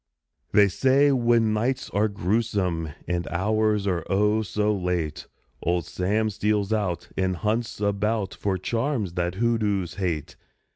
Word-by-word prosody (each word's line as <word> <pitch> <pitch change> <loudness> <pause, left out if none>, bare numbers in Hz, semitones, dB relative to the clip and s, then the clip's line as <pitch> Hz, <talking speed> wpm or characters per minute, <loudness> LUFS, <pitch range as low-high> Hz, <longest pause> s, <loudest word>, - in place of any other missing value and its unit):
_ - - -41
They 105 -1 +6
say 135 +8 +3
when 120 -4 +3
nights 120 +5 -1
are 105 +2 +2
grewsome 100 -5 -1 0.2
And 90 -1 -1
hours 105 +3 +1
are, 90 -4 0
oh! 105 +2 +2
so 105 +1 0
late, 90 -5 -2 0.3
Old 85 0 0
Sam 105 +4 0
steals 105 0 0
out 95 -6 -2
And 95 -1 0
hunts 110 +5 -2
about 105 0 0
For 100 -2 -1
charms 115 - -1
that 90 0 -1
hoodoos 105 -5 0
hate! 85 -5 -2
105 Hz, 140 wpm, -25 LUFS, 90-110 Hz, 0.3 s, They